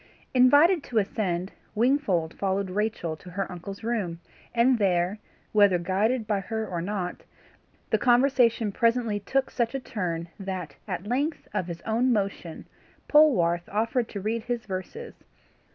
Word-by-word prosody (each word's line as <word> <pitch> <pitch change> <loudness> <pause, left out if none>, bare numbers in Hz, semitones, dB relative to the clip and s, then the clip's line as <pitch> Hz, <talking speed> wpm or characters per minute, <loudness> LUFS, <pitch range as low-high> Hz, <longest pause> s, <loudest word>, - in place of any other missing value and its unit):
Invited 290 +8 +6
to 235 - -3
ascend, 195 -3 -1 0.2
Wingfold 220 - +1
followed 195 -1 -1
Rachel 210 -5 -1
to 180 - -13
her 195 +2 -3
uncle's 195 +4 -8
room, 205 -8 -2 0.3
and 240 +1 +3
there, 185 0 +1 0.3
whether 205 -4 +5
guided 205 +7 0
by 205 -1 0
her 220 +2 -3
or 175 -2 -3
not, 180 -1 -3 0.7
the - - +3
conversation 240 -3 +3
presently 230 -1 +1
took 265 +6 -1
such 235 +1 -1
a - - -1
turn 175 -8 -4
that 185 -6 -5
at 185 -1 -4
length, 280 +8 -1
of 180 - -1
his 170 -1 -6
own 235 +4 +1
motion, 195 -6 -2 0.4
Polwarth 175 - +4
offered 230 +3 0
to 200 - -5
read 220 +3 -2
his 240 -2 -3
verses. 205 - -7
210 Hz, 145 wpm, -26 LUFS, 185-240 Hz, 0.7 s, Invited